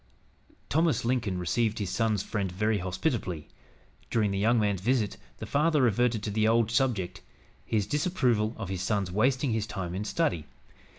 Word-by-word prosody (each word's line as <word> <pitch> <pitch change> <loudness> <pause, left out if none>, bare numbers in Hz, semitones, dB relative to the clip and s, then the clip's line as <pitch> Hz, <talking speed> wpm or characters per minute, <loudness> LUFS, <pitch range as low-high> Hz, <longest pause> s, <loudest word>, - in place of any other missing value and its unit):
Thomas 160 -3 +1
Lincoln 115 -6 0
received 110 +5 0
his 100 -4 -3
son's 110 -4 +1
friend 100 -4 -2
very 105 +3 0
hospitably. 90 - -2 0.6
During 105 -3 +1
the 100 - -1
young 115 +3 +3
man's 100 -3 0
visit, 115 -1 +1 0.2
the - - -6
father 155 +1 +2
reverted 120 -2 +2
to 105 - -2
the 110 +1 +2
old 115 0 +3
subject, 115 -7 0 0.4
his 105 -3 0
disapproval 125 - +1
of 105 -5 -5
his 95 -2 -3
son's 100 -2 0
wasting 125 +6 +2
his 110 -1 -1
time 90 -5 -4
in 95 +3 -3
study. 110 - -1
110 Hz, 165 wpm, -28 LUFS, 100-125 Hz, 0.6 s, young